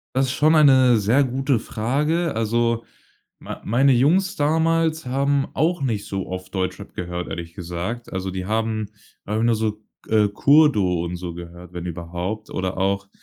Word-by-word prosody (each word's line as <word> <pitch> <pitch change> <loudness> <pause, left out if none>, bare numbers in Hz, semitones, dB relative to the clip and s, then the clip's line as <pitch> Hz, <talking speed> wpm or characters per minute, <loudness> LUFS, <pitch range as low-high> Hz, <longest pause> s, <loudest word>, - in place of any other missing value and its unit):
Das 135 +1 +3
ist 130 - -2
schon 155 +3 +3
eine 130 -6 +6
sehr 115 +7 +3
gute 135 0 0
Frage. 145 +8 -1
Also, 115 +1 0 0.6
mei - - -8
meine 130 +6 +3
Jungs 180 - +2
damals 160 +1 +1
haben 140 +2 +1
auch 160 +2 +1
nicht 110 -6 -2
so 95 -1 -4
oft 95 +1 -7
Deutschrap 95 -1 -4
gehört, 90 0 -4
ehrlich 85 -1 -6
gesagt. 90 +6 -5
Also, 95 0 -3
die 95 0 -5
haben, 110 0 -1 0.3
einfach 110 +2 -1
nur 115 -1 +3
so, 110 0 0 0.3
K - - -15 0.2
äh, - - -3
„Kurdo“ 105 - +3
und 85 +1 -4
so 85 -1 -6
gehört, 85 +1 -10
wenn 90 -1 -6
überhaupt 90 +5 -5
oder 95 0 -3
auch, 100 +1 0
110 Hz, 170 wpm, -22 LUFS, 95-140 Hz, 0.6 s, eine